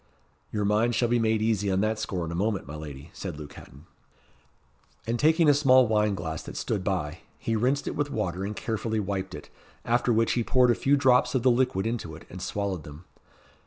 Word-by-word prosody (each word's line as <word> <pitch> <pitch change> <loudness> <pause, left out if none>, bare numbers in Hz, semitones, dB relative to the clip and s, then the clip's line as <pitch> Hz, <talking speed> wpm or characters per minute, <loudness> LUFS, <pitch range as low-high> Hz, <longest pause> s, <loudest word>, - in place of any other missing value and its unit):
"Your 105 -1 -1
mind 110 +3 +2
shall 120 - +1
be 120 0 +2
made 110 -1 +1
easy 105 -3 +1
on 95 0 +1
that 110 +1 0
score 95 -5 -3
in 80 - -5
a - - -4
moment, 100 +2 -1
my 70 +3 -8
lady," 75 0 -9
said 90 -6 -6
Luke 75 -2 -9
Hatton. 70 +5 -14 1.2
And 115 +2 -1
taking 160 +2 +4
a 145 - +7
small 130 -3 +5
wine 105 -2 +2
glass 80 -3 -4
that - - -9
stood 100 -4 -2
by, 90 -4 -2 0.2
he 115 - -2
rinsed 130 +6 0
it - - -3
with 145 0 -1
water 95 -7 -2
and 105 +2 -4
carefully 110 0 -2
wiped 95 -2 -3
it; - - -11 0.3
after 120 +1 +2
which 115 0 +2
he 120 - +1
poured 125 +1 +4
a - - +4
few 140 +4 +2
drops 130 -1 +3
of 125 - +1
the 130 - +5
liquid 120 -6 +1
into 115 -9 -3
it 80 - -13
and 90 - -8
swallowed 100 -3 -2
them. 75 +4 -12
105 Hz, 220 wpm, -27 LUFS, 90-120 Hz, 1.2 s, a